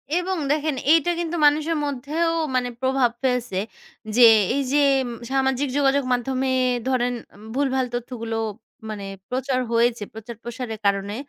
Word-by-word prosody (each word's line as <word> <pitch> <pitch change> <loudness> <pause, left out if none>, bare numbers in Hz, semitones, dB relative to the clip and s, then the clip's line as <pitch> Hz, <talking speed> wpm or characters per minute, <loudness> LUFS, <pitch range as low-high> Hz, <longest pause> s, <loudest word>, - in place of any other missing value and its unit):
এবং 365 +1 0
দেখেন 305 -1 0 0.2
এইটা 330 +1 +4
কিন্তু 345 0 -2
মানুষের 310 +2 +3
মধ্যেও 290 +5 -1 0.2
মানে 250 -1 +1
প্রভাব 260 -2 +2
ফেলছে। 250 -6 0 0.6
যে 250 - +4 0.3
এই 280 - +1
যে 295 - +4 0.5
সামাজিক 265 +1 +1
যোগাযোগ 280 0 +3
মাধ্যমে 260 +2 -1 0.4
ধরেন 250 -1 +1 0.4
ভুলভাল 265 -1 +1
তথ্যগুলো 230 -2 -4 0.5
মানে 205 -2 -5 0.2
প্রচার 260 0 -1
হয়েছে, 235 -1 +2
প্রচার-প্রসারের 230 +1 -7
কারণে 200 +1 +1
260 Hz, 120 wpm, -23 LUFS, 240-285 Hz, 0.6 s, এইটা